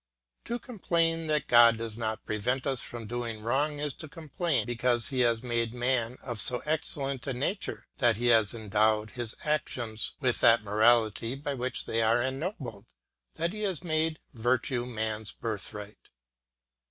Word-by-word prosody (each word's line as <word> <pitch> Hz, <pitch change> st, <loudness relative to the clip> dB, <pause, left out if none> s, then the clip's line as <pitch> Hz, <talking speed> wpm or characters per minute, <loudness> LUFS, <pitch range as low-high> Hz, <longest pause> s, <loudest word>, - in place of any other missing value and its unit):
To 240 Hz, -, -2 dB
complain 165 Hz, -8 st, 0 dB
that 150 Hz, -1 st, +1 dB
God 120 Hz, -1 st, +7 dB
does 115 Hz, -1 st, -5 dB
not 110 Hz, -1 st, -3 dB
prevent 125 Hz, +5 st, -1 dB
us 135 Hz, -2 st, 0 dB
from 120 Hz, -2 st, -7 dB
doing 115 Hz, -1 st, -4 dB
wrong 145 Hz, +6 st, +1 dB
is 145 Hz, -2 st, -2 dB
to 155 Hz, -, -7 dB
complain 160 Hz, 0 st, -1 dB
because 120 Hz, 0 st, +1 dB
he 130 Hz, -3 st, -2 dB
has 120 Hz, -1 st, +3 dB
made 120 Hz, -1 st, -1 dB
man 125 Hz, -1 st, 0 dB
of 120 Hz, -5 st, -2 dB
so 125 Hz, +4 st, +3 dB
excellent 140 Hz, -3 st, -1 dB
a 135 Hz, -, -1 dB
nature, 145 Hz, +11 st, -3 dB
that 120 Hz, -3 st, +4 dB
he 120 Hz, +3 st, +1 dB
has 110 Hz, -1 st, +3 dB
endowed 110 Hz, 0 st, +1 dB
his 120 Hz, -2 st, -2 dB
actions 120 Hz, -7 st, -2 dB
with 130 Hz, -4 st, +1 dB
that 115 Hz, -1 st, +5 dB
morality 110 Hz, +2 st, +3 dB
by 140 Hz, +1 st, -4 dB
which 130 Hz, 0 st, -3 dB
they 115 Hz, -, 0 dB
are 115 Hz, +2 st, +3 dB
ennobled, 130 Hz, -, -4 dB, 0.5 s
that 170 Hz, +3 st, -1 dB
he 215 Hz, -, -6 dB
has 190 Hz, -5 st, -2 dB
made 160 Hz, -1 st, 0 dB, 0.2 s
virtue 120 Hz, +1 st, 0 dB
man's 110 Hz, -2 st, -3 dB
birthright. 105 Hz, -1 st, -6 dB
120 Hz, 160 wpm, -29 LUFS, 115-145 Hz, 0.5 s, God